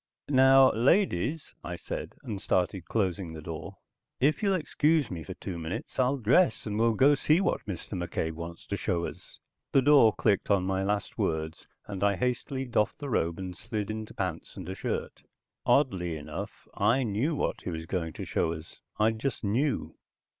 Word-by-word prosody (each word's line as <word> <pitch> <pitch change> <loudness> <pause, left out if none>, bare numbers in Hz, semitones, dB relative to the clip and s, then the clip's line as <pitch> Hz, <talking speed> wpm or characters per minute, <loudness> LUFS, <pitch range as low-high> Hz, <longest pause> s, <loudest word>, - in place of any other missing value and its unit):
"Now 135 0 +7
ladies," 140 - +2
I 90 - -4
said, 85 - -6
and 100 -3 -5
started 90 -1 0
closing 95 -5 -1
the 80 - -7
door. 80 +4 -7 0.4
"If 150 - +2
you'll 200 -2 +3
excuse 155 - +1
me 85 -3 -4
for - - -7
two 90 -3 -6
minutes 80 +9 -5
I'll 130 +2 +3
dress 135 - +3
and 105 0 -2
we'll 115 -1 +3
go 140 +6 +6
see 155 +3 +3
what 195 - 0
Mr. 90 -5 -5
McCabe 85 -4 -2
wants 85 +1 -8
to 100 - -3
show 85 -3 -1
us." - - -9 0.4
The 135 - +5
door 140 -6 +7
clicked 100 -4 +1
on 100 -3 +3
my 95 0 0
last 100 0 -2
words, 80 0 -2 0.2
and 100 -1 -4
I 100 -1 +3
hastily 125 +5 -2
doffed 115 -4 +1
the 145 -3 -5
robe 85 -6 +1
and 95 -1 -5
slid 105 +4 -4
into 110 0 -6
pants - - -4
and - - -7
a - - -3
shirt. 95 - -4 0.5
Oddly 95 - +2
enough, 75 0 -7
I 130 +4 +2
knew 120 +8 0
what - - -1
he - - -5
was 80 -1 -4
going 85 -2 -2
to - - -6
show 80 - 0
us. 80 0 -10 0.2
I 110 +1 +4
just 115 +3 -3
knew. 125 +8 0
105 Hz, 185 wpm, -29 LUFS, 90-130 Hz, 0.5 s, Now